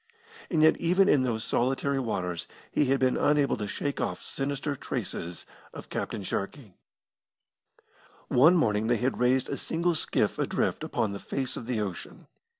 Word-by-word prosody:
And 160 -3 +2
yet 160 - +6
even 185 +3 +3
in 145 -8 +5
those 115 -3 -1
solitary 135 +3 0
waters 90 -8 -2 0.2
he 150 - +2
had 135 +1 +2
been 130 -1 +2
unable 145 -2 +3
to 105 - -3
shake 140 +8 -3
off - - -2
sinister 140 +1 -3
traces 95 -10 -5 0.3
of - - -9
Captain 100 - -3
Sharkey. 100 +3 -4 1.5
One 155 +8 +6
morning 110 -9 +2
they 120 0 +3
had 125 +3 -1
raised 125 +1 +3
a - - -3
single 170 +2 0
skiff 155 - 0
adrift - - 0
upon 105 - -1
the 100 - -5
face 135 +4 -3
of 115 - -7
the 120 -4 -1
ocean. 95 -4 -6
130 Hz, 160 wpm, -28 LUFS, 110-145 Hz, 1.5 s, yet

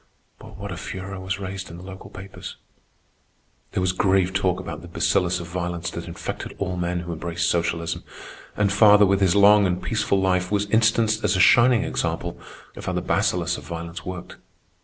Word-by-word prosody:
But - - -12
what 100 0 -6
a 90 - -5
furor 95 +1 -6
was 95 0 -3
raised 95 -1 -6
in 85 - -9
the 90 - -11
local 95 0 -10
papers! 95 +1 -9 1.2
There - - 0
was 90 -1 +2
grave 95 0 +2
talk 95 -1 +1
about 85 -4 -6
the 85 - -10
bacillus 90 +1 +1
of 85 - -6
violence 85 0 -4
that - - -6
infected - - -6
all 95 -2 -2
men 90 0 -2
who 85 0 -5
embraced 85 +1 -2
socialism; 85 -1 -1 0.5
and 100 -1 +2
father, 105 -1 +7
with 100 0 +2
his 95 -1 +3
long 100 0 +6
and 90 0 -1
peaceful 110 -3 0
life, 90 -1 +1
was 105 0 +1
instanced 110 -1 +3
as 105 -1 +2
a - - +1
shining 120 +4 +6
example - - -3 0.4
of - - -9
how - - -1
the - - -1
bacillus - - 0
of - - -14
violence 85 0 -6
worked. 90 -1 -7
95 Hz, 190 wpm, -23 LUFS, 85-100 Hz, 1.2 s, father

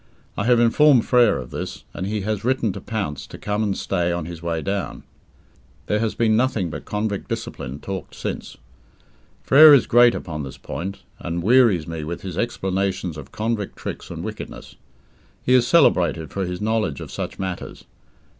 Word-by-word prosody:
I 100 - -2
have 120 0 +4
informed 125 +2 +5
Frere 120 -4 +4
of - - -7
this, - - -6
and 95 - -4
he 105 0 -2
has 105 0 -2
written 120 -4 +1
to - - -7
Pounce 100 -11 -4
to - - -10
come 105 +1 -2
and 100 -3 0
stay 90 -3 0
on 85 -2 -2
his 85 -1 -8
way 85 -1 -2
down. 100 -1 -3 0.8
There 105 - 0
has 110 -1 -1
been 110 -2 +3
nothing 110 -8 +1
but 75 - -7
convict 105 -1 -3
discipline 65 +3 -5
talked 95 +1 -6
since. - - -5 0.9
Frere 150 +1 +9
is 135 - +3
great 120 0 +5
upon 75 -3 -5
this 65 -2 -7
point, 95 +3 -6 0.2
and 85 0 -3
wearies 110 -7 +4
me 80 -1 -5
with 85 +3 -5
his 95 -4 -5
explanations 95 -5 -1
of 70 -3 -10
convict 110 -2 -2
tricks - - -7
and - - -6
wickedness. - - -8 0.7
He 125 - +2
is 125 -1 +5
celebrated 90 - +3
for 95 -2 -2
his 90 +1 -5
knowledge 110 -9 0
of - - -8
such - - -5
matters. 95 -2 -6
100 Hz, 180 wpm, -22 LUFS, 85-115 Hz, 0.9 s, Frere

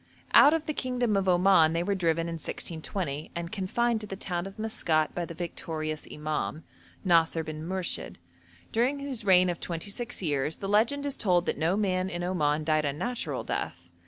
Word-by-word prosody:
Out 290 - +9
of 320 -1 -2
the 305 - -2
kingdom 250 -5 0
of 195 -1 +2
Oman 180 -3 +5
they 170 +1 0
were 200 - 0
driven 165 -3 +1
in 170 - -3
1620, 160 -3 -4
and 170 0 -4
confined 220 +3 0
to 210 - -6
the 195 - -5
town 180 -1 -3
of 195 - -11
Maskat 170 -8 0
by 175 - -2
the 170 - -9
victorious 155 -2 -4
imam, 155 +1 -3 0.4
Nasir 165 -2 +3
bin 155 -1 -6
Murshid, 185 +1 -3 0.6
during 255 +5 +1
whose 270 -6 -3
reign 185 -2 +6
of 175 -2 -2
twenty 170 +3 -4
six 240 -1 -4
years 145 -1 0
the 195 - -5
legend 230 +8 +2
is 280 -1 0
told 180 -4 +2
that - - -2
no 170 +5 +2
man 185 -3 0
in 175 -1 -4
Oman 155 -4 +1
died 155 -1 +2
a 140 - +1
natural 240 - -3
death. - - -4
180 Hz, 190 wpm, -28 LUFS, 160-210 Hz, 0.6 s, Out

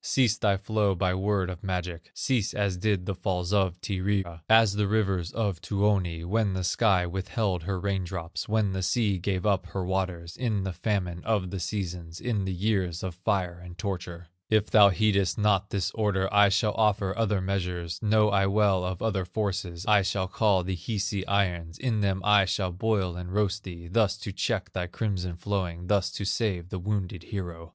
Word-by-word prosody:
"Cease 120 -5 +3
thy 100 -5 +2
flow, 105 -1 +1
by 90 0 +1
word 95 0 0
of 90 -1 -7
magic, 90 -3 -4
Cease 115 -6 0
as 100 -3 0
did 95 -1 0
the 100 - -2
falls 90 0 -2
of 95 -3 +1
Tyrya, 95 -3 -2
As 110 -2 +6
the 105 0 +1
rivers 95 -5 0
of 100 -6 -2
Tuoni, 95 -3 0
When 105 +1 +1
the 95 - -2
sky 95 0 +3
withheld 95 +1 -2
her 95 +2 -3
rain 100 -1 -1
drops, 85 0 -5
When 110 -2 +2
the 95 0 -2
sea 100 0 +1
gave 95 +1 -2
up 95 -3 +1
her 95 0 -3
waters, 90 -2 -2
In 110 -6 -1
the 95 -1 -3
famine 90 -2 -2
of 100 -5 0
the 95 - -3
seasons, 85 -3 -4
In 110 -6 -1
the 95 - -2
years 95 -3 -1
of 95 -2 -3
fire 90 -1 -1
and 90 -1 -10
torture. 90 -4 -5 0.2
If 110 -1 +2
thou 105 -2 +8
heedest 100 -1 +2
not 105 -2 +2
this 100 -3 -1
order, 100 -3 0
I 105 0 +6
shall 105 +2 +2
offer 105 -3 +1
other 110 -3 +1
measures, 90 -3 -3
Know 105 -1 +4
I 95 -1 +3
well 100 -2 +3
of 90 +1 -3
other 100 -4 0
forces; 90 -2 -3
I 105 -1 +5
shall 95 -1 -1
call 100 -1 +2
the 95 +1 -2
Hisi 100 0 -3
irons, 90 -5 0
In 120 -4 0
them 95 -1 0
I 105 -1 +6
shall 95 -1 -1
boil 95 -1 0
and 90 0 -6
roast 105 0 0
thee, 85 -2 -8
Thus 105 +1 +2
to 105 - -6
check 105 0 -2
thy 90 -1 -2
crimson 90 -3 -3
flowing, 90 -2 -3
Thus 100 -1 +2
to 100 - -4
save 95 -4 -1
the 95 - -4
wounded 95 -2 -2
hero. 85 -4 -6
95 Hz, 190 wpm, -27 LUFS, 90-105 Hz, 0.2 s, thou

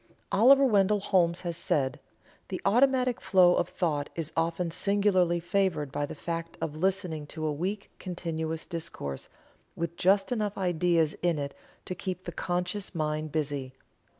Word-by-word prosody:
Oliver 270 +6 +6
Wendell 205 -3 +3
Holmes 180 -3 +2
has 170 -2 -3
said: 145 -7 0 0.5
"The - - -4
automatic 250 +3 +3
flow 180 -2 +5
of - - 0
thought 150 -5 -1
is 165 -2 -3
often 165 +1 0
singularly 185 -2 +2
favored 170 -5 0
by 145 +1 -2
the - - -7
fact 165 +1 -5
of 155 -2 -3
listening 170 -3 -1
to 155 +1 -5
a 155 - 0
weak 195 +7 -3
continuous 165 -3 -4
discourse, 155 - -6 0.5
with 170 0 -4
just 195 +2 +3
enough 210 -4 -1
ideas 175 -3 +2
in 175 -2 +2
it 140 -1 -4 0.3
to - - -3
keep 185 0 -5
the - - -5
(conscious) 180 +2 -3
mind 155 -1 -2
busy. 140 -4 -2
175 Hz, 150 wpm, -29 LUFS, 155-195 Hz, 0.5 s, Oliver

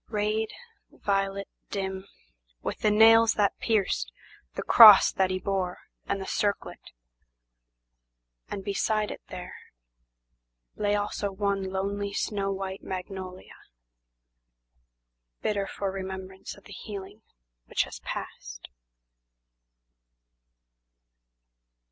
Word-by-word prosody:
Rayed, 215 0 0 0.4
violet, 195 0 -1 0.2
dim, 190 -1 -4 0.6
With - - -3
the 215 - +3
nails 225 +1 +6
that 205 -2 +1
pierced, 190 - 0 0.4
the - - -3
cross 215 -4 +9
that 190 -1 +1
he 185 - -1
bore 185 -2 -2 0.3
and 195 - -1
the 190 - -5
circlet, 205 +1 -2 1.6
And 195 - -5
beside 210 +2 0
it - - -8
there, 180 -1 -8 1.2
lay 205 0 +1
also 205 -1 -2
one 200 0 -1
lonely 200 +1 -2
snow 200 -1 -1
white 190 0 -4
magnolia, 185 0 -7 1.9
Bitter 200 -2 0
for 195 -1 -3
remembrance 190 0 -7
of - - -17
the 205 - -12
healing 200 +1 -8 0.5
which - - +1
has - - -9
passed. - - -7
195 Hz, 100 wpm, -27 LUFS, 190-205 Hz, 1.9 s, cross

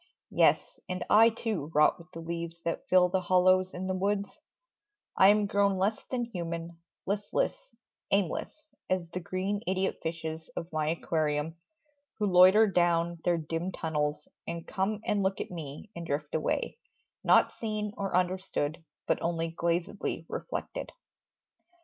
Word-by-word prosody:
Yes, - - +3
and 180 0 -3
I 225 +2 +8
too 220 -9 -3
rot 150 +4 +5
with 170 +1 -15
the 165 - -8
leaves 170 0 -5
that 165 - -2
fill 180 -1 +6
The 185 +1 +1
hollows 185 +1 +4
in 180 +1 -4
the 190 - -1
woods; 200 +2 -1 0.8
I 190 - +7
am 210 +1 +5
grown 200 -1 +2
less 200 +4 0
Than 245 -2 -2
human, 170 -5 -5 0.3
listless, 205 - 0 0.6
aimless 195 -4 0 0.4
as 185 -2 0
the 180 - -3
green 190 +3 -2
Idiot 190 +1 0
fishes 160 -1 -4
of 165 0 -5
my 155 -1 0
aquarium, 155 -1 -1 0.6
Who 210 - 0
loiter 190 +3 +7
down 170 -3 +2
their 175 -1 +2
dim 165 +3 -3
tunnels 150 -3 -2 0.2
and 170 -1 -4
come 205 +2 -1
And 205 - +1
look 195 0 0
at - - -4
me 160 +3 -8
and 170 - -5
drift 150 -2 -3
away, 160 - -1 0.4
nought - - +5
seen 215 -2 -3
Or 195 -2 -2
understood, 180 -3 -1 0.2
but - - 0
only 165 -1 -1
glazedly 170 +4 -2
Reflected. - - -5
180 Hz, 150 wpm, -30 LUFS, 165-195 Hz, 0.8 s, I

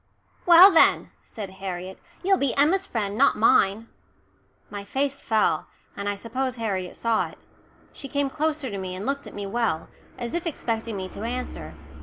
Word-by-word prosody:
"Well, 350 +3 +10
then," 330 - +4
said 205 -4 -8
Harriet, 185 0 -6 0.2
"you'll 385 +1 +3
be 275 -3 +1
Emma's 355 +7 +4
friend, 205 -3 -2
not 275 +5 +3
mine." 215 0 +3 0.8
My 205 -1 -6
face 275 +5 -2
fell, 220 -1 +1 0.3
and 200 0 -3
I 205 - -1
suppose 255 +5 -3
Harriet 195 -6 -3
saw 230 -1 0
it. - - -15 0.6
She 275 - -8
came 280 +1 0
closer 300 -4 -1
to 200 - -4
me 185 -1 -5
and 190 - -6
looked 280 +1 -2
at - - -11
me 205 -1 -4
well, 200 -6 -1 0.3
as 240 -2 -5
if 345 0 -2
expecting 230 -7 -3
me 190 -1 -4
to - - -9
answer. 225 - -5
230 Hz, 175 wpm, -25 LUFS, 200-280 Hz, 0.8 s, Well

